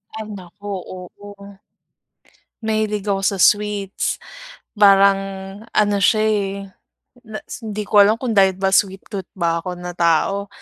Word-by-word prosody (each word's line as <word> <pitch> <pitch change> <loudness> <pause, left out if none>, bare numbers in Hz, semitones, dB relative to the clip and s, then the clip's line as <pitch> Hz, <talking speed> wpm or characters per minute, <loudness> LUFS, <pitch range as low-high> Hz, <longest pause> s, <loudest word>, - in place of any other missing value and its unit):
Ay 220 0 -5
naku, 195 +2 -12 0.3
oo. 200 +2 -12 1.0
Mahilig 215 -2 -1
ako 195 -1 0
sa 195 -1 0
sweets. 205 -2 +1 0.6
Parang 200 -1 +6 0.5
ano 205 -1 +2
siya 215 +1 +4
eh, 205 -2 0 0.7
na 215 -1 -8 0.2
hindi 210 -1 -4
ko 205 0 +4
alam 205 +2 +5
kung 235 0 -3
dahil 195 -3 +4
ba 190 0 0
sweet 195 0 +1
tooth 195 -2 -5
ba 170 -1 0
ako 180 +1 -6
na 180 0 -7
tao 175 +4 +1
200 Hz, 135 wpm, -20 LUFS, 190-210 Hz, 1.0 s, Parang